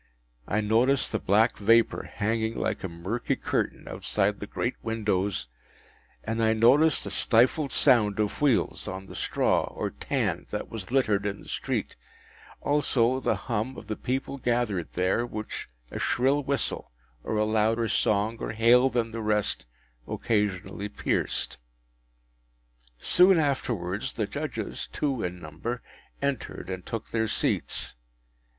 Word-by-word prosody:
I 105 - +1
noticed 120 +6 +2
the 110 - 0
black 110 +5 +3
vapour 115 +3 +3
hanging 110 +1 -1
like - - -2
a 95 - -2
murky 95 +8 -2
curtain - - -2
outside 105 0 0
the 105 - -6
great 120 +4 -2
windows, 105 - -1 0.8
and 115 +1 -2
I 110 0 +4
noticed 130 +8 +5
the - - -5
stifled 130 +5 +3
sound 110 -7 +4
of 105 +4 -1
wheels 140 -6 +1
on 95 +1 -5
the - - -11
straw - - +1
or - - -4
tan - - -2
that - - -4
was 110 -5 -6
littered 110 -6 +2
in 100 0 -4
the - - -14
street; - - -3 0.6
also, 130 -4 +2
the - - +1
hum 120 +2 -2
of - - -9
the 110 0 -3
people 135 +4 -3
gathered 120 -8 0
there, 90 +6 +1
which 110 -3 -6 0.2
a - - -4
shrill 135 +4 +2
whistle, 140 -2 -2 0.3
or 110 - -2
a 105 - +3
louder 110 +1 +2
song 105 +2 +1
or - - -4
hail 120 +4 +5
than 120 -2 -1
the 115 0 -4
rest, 105 - +1 0.4
occasionally 100 -2 -1
pierced. 105 - -2 1.4
Soon 180 - +5
afterwards 120 - -1
the - - -1
Judges, - - -4
two 135 -5 -1
in 90 0 -3
number, 85 +10 -5 0.4
entered, 135 -8 -3
and 95 -1 -6
took 115 -1 -5
their 110 -1 +1
seats. - - -1
110 Hz, 145 wpm, -27 LUFS, 105-125 Hz, 1.4 s, noticed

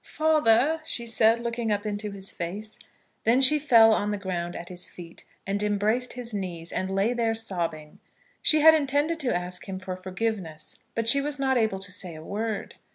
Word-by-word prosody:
"Father," 310 -1 +2
she 235 -6 -2
said, 225 0 +3
looking 235 -1 -2
up 205 0 -1
into 210 0 -3
his 195 -1 -5
face. 205 +6 -4 0.4
Then 235 +3 +4
she 300 +3 +5
fell 230 -6 +6
on 205 -1 0
the 205 - -1
ground 175 -3 -4
at 170 - -7
his 180 0 -4
feet, 170 -1 -12 0.2
and 200 +1 -1
embraced 210 +4 0
his 240 -2 -4
knees, 175 -4 -4
and 185 - -2
lay 195 +5 +1
there 230 -2 0
sobbing. 170 -8 -4 0.4
She 310 -1 +4
had 320 +1 +9
intended 295 +2 +1
to 260 - 0
ask 180 +2 -4
him 190 - -4
for 185 0 -5
forgiveness, 185 -3 -4 0.2
but 230 0 -1
she 280 +4 +5
was 290 0 -3
not 265 -1 +1
able 220 -5 +1
to 195 0 -9
say 185 -3 -4
a 155 - -10
word. 215 +3 -4
215 Hz, 195 wpm, -26 LUFS, 185-240 Hz, 0.4 s, had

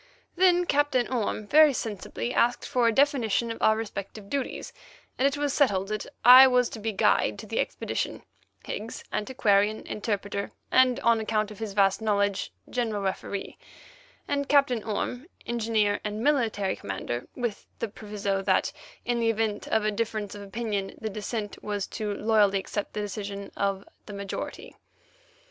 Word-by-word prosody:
Then 355 -1 +4
Captain 290 -5 +2
Orme 220 -3 -1
very 300 +5 +6
sensibly 225 +1 -4
asked 245 +1 +2
for 250 -4 +2
a - - +4
definition 235 -4 +2
of 230 - -7
our 220 0 +4
respective 205 -1 -6
duties, 280 -2 -3 0.5
and 270 - +5
it 280 +1 -1
was 290 -1 0
settled 195 -9 +2
that 215 -1 -3 0.2
I 255 +2 +11
was 250 -2 +3
to 225 - -8
be 220 +1 -2
guide 205 0 +2
to 210 - -8
the 225 +1 -3
expedition; - - -2 0.4
Higgs, 220 +2 -6
antiquarian, 215 -3 +1
interpreter, 205 -1 -3 0.2
and, 255 0 +4
on 235 -3 +4
account 215 -1 -1
of 210 - -11
his 220 -3 -4
vast 195 +1 +3
knowledge, 200 -2 0 0.2
general 225 -5 -2
referee; 195 +1 -4 0.7
and 280 -1 -1
Captain 275 -6 +3
Orme, 245 +6 -3 0.2
engineer 220 -3 +1
and 210 +1 -3
military 225 -9 +1
commander, 110 +5 -5
with 240 -5 -4
the 230 - -2
proviso 205 -2 -3
that, 190 -1 +1 0.3
in 240 0 0
the 230 -1 +2
event 220 -2 -1
of 220 -1 +1
a 215 - +2
difference 215 -1 -3
of 205 - -8
opinion, 200 -1 -3
the 220 -1 -4
dissentient 210 0 -5
was 205 -2 -2
to 210 -2 -4
loyally 210 -3 +3
accept 200 +1 -4
the 210 - -2
decision 200 -1 -5
of 195 0 -1 0.2
the 210 - -7
majority. 200 -1 -6
215 Hz, 160 wpm, -27 LUFS, 205-240 Hz, 0.7 s, I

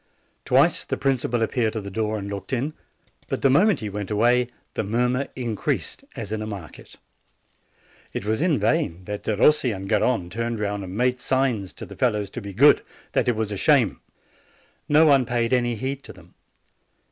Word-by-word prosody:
Twice - - +4
the - - -3
principal 125 -4 0
appeared 115 -1 0
at 110 - -3
the 100 - -7
door 110 +1 -1
and 100 -1 -5
looked 100 -1 -6
in; 135 +5 -1 0.5
but - - -3
the 135 - +5
moment 185 - +4
he 105 - -3
went 100 0 -5
away 120 +3 +3 0.3
the - - -2
mur 115 +5 +1
mur 125 +3 -1
increased 115 -5 -2
as 105 -3 -6
in 110 0 -2
a 110 - -4
market. 100 -7 -9 1.2
It - - -5
was 110 +5 0
in 165 -4 +2
vain 95 - 0
that 105 +2 -6
Derossi 125 +5 +3
and 95 -1 -5
Garrone 105 -4 +1
turned 115 0 -2
round 105 -1 -2
and 95 +2 -7
made 125 +1 +1
signs 125 -8 0
to - - -9
the - - -11
fellows 105 -6 0
to 125 - -6
be 100 -1 -7
good, 140 +10 +6 0.3
that - - +1
it 120 - +2
was 110 -1 -2
a 100 - -3
shame. - - +3 0.9
No 150 +2 +6
one 140 -4 +5
paid 120 0 0
any 120 -1 +2
heed 135 +4 -4
to - - -9
them. 90 -1 -18
115 Hz, 195 wpm, -24 LUFS, 105-125 Hz, 1.2 s, good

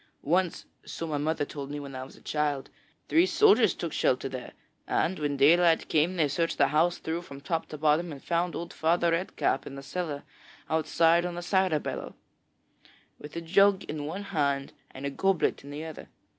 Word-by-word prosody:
Once 175 +3 0 0.2
so 165 - -6
my 150 -3 -2
mother 150 0 0
told 140 -1 -7
me 145 0 -4
when 140 -1 -8
I 130 0 -5
was 130 - -12
a - - -19
child 145 -3 -1 0.4
three 335 +3 +4
soldiers 425 +1 +5
took - - -4
shelter - - +1
there, - - -7 0.3
and 190 - 0
when 145 -2 -1
daylight 165 +4 +4
came 160 +4 +2
they 160 -4 +2
searched 165 +4 -1
the 140 -1 +4
house 165 +4 +2
through 165 +2 -3
from 140 -5 -10
top 160 +3 -2
to 155 - -7
bottom 155 +3 +2
and 140 -2 -9
found 170 +1 0
old 170 - -5
Father 170 +1 +2
Red 170 +3 -1
Cap 135 - 0
in 135 - -8
the 135 - -8
cellar 145 -1 -4 0.5
outside 165 +1 +3
on 175 -1 -4
a 175 - -5
cider 185 -3 +2
barrel, - - -5 1.0
with 150 +2 -10
a 170 - -3
jug 195 +3 +4
in 150 -1 -5
one 190 +6 -5
hand 140 -7 -1 0.2
and 135 +2 -8
a 140 - -1
goblet 190 +1 +1
in 140 - -11
the 150 +2 -6
other. 160 -2 -9
160 Hz, 200 wpm, -28 LUFS, 145-175 Hz, 1.0 s, soldiers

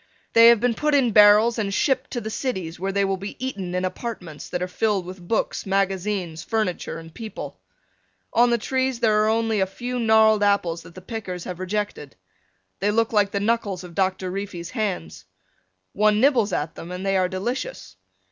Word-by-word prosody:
They 230 0 +8
have 235 -2 +7
been 245 +1 +1
put 300 +5 +1
in 255 -5 +3
barrels 210 +3 +6
and 200 -2 -1
shipped 265 +5 +1
to 240 - -4
the 220 - -5
cities 185 -11 -3
where 195 +2 -2
they 200 0 +1
will 195 0 -1
be 200 +2 -7
eaten 195 -9 -4
in 180 0 0
apartments 180 -6 -6
that 180 0 -2
are - - -2
filled 200 0 0
with 180 -1 -10
books, 225 - -1
magazines, 190 -3 -1
furniture, 215 -6 -2
and 165 0 -11
people. 220 +3 -8 0.7
On 240 +1 +5
the 235 - +3
trees 260 +1 -1
are 215 -1 +4
only 225 -1 +1
a 190 - +2
few 245 +6 -5
gnarled 220 -2 +4
apples 200 -5 +1
that 165 - -15
the 185 - -9
pickers 185 -5 -5
have 180 -1 -6
rejected. 185 -6 -4 0.6
They 205 - +1
look 225 +2 +1
like 205 -2 +3
the 200 - -2
knuckles 205 -3 -1
of 175 -1 -10
Doctor 185 0 -1
Reefy's 190 -3 -5
hands. 205 - -3 0.7
One 210 0 +3
nibbles 245 -5 +3
at 155 -1 -2
them 170 +1 -9
and 180 +2 -5
they 195 0 +1
are 185 -1 +2
delicious. 190 - -4
205 Hz, 190 wpm, -23 LUFS, 185-225 Hz, 0.7 s, They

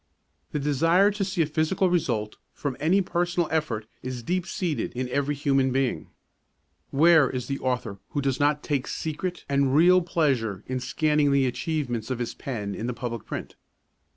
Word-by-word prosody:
The - - -1
desire 165 +8 +3
to 205 0 -2
see 190 -3 +1
a - - 0
physical 160 +5 +1
result 115 -11 0 0.2
from 140 -3 -3
any 185 +6 +3
personal 175 -1 0
effort 150 -9 -1 0.2
is 125 -1 -5
deep 180 +6 -1
seated 175 -7 -2
in 125 +1 -2
every 140 +2 0
human 135 -2 +2
being. 130 -1 0 0.8
Where 155 -1 +5
is 125 -2 -3
the 140 0 -3
author 125 -6 -2
who 145 - -2
does 135 -2 0
not 145 0 +2
take 140 -4 -1
secret 175 +3 -4
and 140 -1 +2
real 180 +4 +6
pleasure 135 - 0
in 130 0 -2
scanning 150 +3 +1
the 140 -1 +3
achievements 125 -4 -2
of 130 - -1
his 120 -1 -3
pen 105 -7 -4
in 110 +4 -4
the 125 - -3
public 115 -2 -5
print? - - -5
140 Hz, 175 wpm, -26 LUFS, 125-165 Hz, 0.8 s, real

